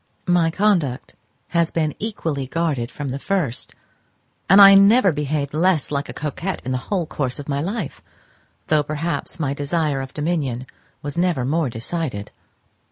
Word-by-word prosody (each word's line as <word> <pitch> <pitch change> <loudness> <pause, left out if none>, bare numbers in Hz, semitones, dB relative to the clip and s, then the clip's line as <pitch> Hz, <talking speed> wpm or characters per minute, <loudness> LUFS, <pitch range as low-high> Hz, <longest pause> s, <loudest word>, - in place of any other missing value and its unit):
My 175 -2 +3
conduct 165 -9 0 0.3
has 170 -1 +2
been 155 -3 -1
equally 160 - -3
guarded 140 -6 -1
from 145 0 -5
the 135 +2 -4
first, 160 -9 -2 0.7
and 195 +3 +8
I 195 0 +11
never 200 +1 +6
behaved 145 -1 -2
less 165 -2 +2
like 140 -1 -2
a - - -3
coquette 155 +5 -4
in 130 - -2
the 130 - 0
whole 185 -5 0
course 130 -5 -3
of 145 - -8
my 140 -1 -1
life, 195 -1 -4 0.6
though 155 -1 +3
perhaps 155 +4 -3
my 140 -3 0
desire 145 -1 -1
of 135 0 -8
dominion 145 -6 -1 0.4
was 145 +4 -4
never 175 -8 +1
more 155 +1 0
decided. 115 -2 -4
155 Hz, 160 wpm, -21 LUFS, 140-175 Hz, 0.7 s, I